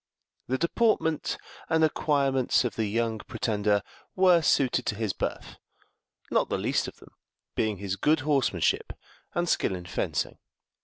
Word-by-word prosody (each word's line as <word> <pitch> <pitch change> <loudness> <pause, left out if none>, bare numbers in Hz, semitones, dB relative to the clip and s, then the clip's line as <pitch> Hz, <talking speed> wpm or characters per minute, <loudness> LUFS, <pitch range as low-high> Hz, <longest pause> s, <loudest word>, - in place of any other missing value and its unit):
The 130 - 0
deportment 170 - +1 0.3
and 160 -1 +3
acquirements 140 -5 +2
of 120 - -2
the 110 -1 0
young 115 +1 -1
pretender 105 -1 0 0.3
were 185 -2 +5
suited 140 -4 +2
to 105 - 0
his 110 -3 -1
birth, - - -4 0.7
not - - +2
the - - 0
least - - 0
of - - -8
them - - -17 0.4
being 110 -2 0
his 100 0 -3
good 150 +4 +2
horsemanship 135 - +1 0.4
and 175 0 +1
skill 95 - +1
in 90 -1 -8
fencing. 90 - -2
130 Hz, 145 wpm, -27 LUFS, 105-155 Hz, 0.7 s, were